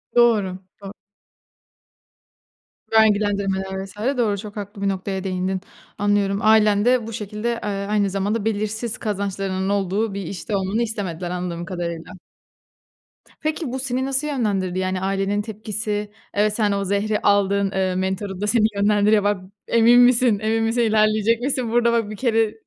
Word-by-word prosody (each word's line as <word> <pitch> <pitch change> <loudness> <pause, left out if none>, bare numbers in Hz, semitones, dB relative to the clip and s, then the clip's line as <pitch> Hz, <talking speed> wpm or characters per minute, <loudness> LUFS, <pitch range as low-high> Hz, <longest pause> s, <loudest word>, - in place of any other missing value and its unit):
Doğru 215 -6 +3 0.2
do 195 0 -8 2.0
Vergilendirmeler 200 -3 +2
vs. 195 - -14 0.2
doğru, 210 -4 +1
çok 210 +1 -8
haklı 205 0 -7
bir 200 - +1
noktaya 190 0 -3
değindin. 185 0 -2 0.4
Anlıyorum, 205 -1 +1
ailen 215 -1 +4
de 245 -2 +3
bu 225 - -6
şekilde, 210 +1 -4
eee, 210 - -2 0.2
aynı 205 -1 +2
zamanda, 200 +3 -1
belirsiz 220 +2 -2
kazançlarının 195 -2 -2
olduğu 200 +2 0
bir 200 - -4
işte 195 +4 -4
olmanı 195 +4 0
istemediler 185 -6 -4
anladığım 175 -1 -4
kadarıyla. 170 -2 -5 1.3
Peki, 310 -3 -2
bu 260 - -3
seni 260 0 -2
nasıl 270 +2 -1
yönlendirdi, 200 -9 -1
yani, 185 0 -1
ailenin 195 +1 0
tepkisi, 210 -1 -4 0.3
eee, 205 - +4
ve 215 - +3
sen 210 -1 0
o 200 0 0
zehri 205 +2 0
aldığın, 200 -1 +2
eee, 190 -1 0
mentörün 190 +1 -3
de 210 - 0
seni 215 -1 +3
yönlendiriyor, 205 +1 +3
bak, 205 -2 0 0.3
emin 235 +1 +5
misin, 245 -3 +4
emin 220 +1 0
misin, 225 +2 +1
ilerleyecek 215 0 +2
misin 255 -3 -1
burada 235 0 +3
bak 225 -3 0
bir 215 - -6
kere 225 -2 +1
205 Hz, 150 wpm, -22 LUFS, 195-225 Hz, 2.0 s, emin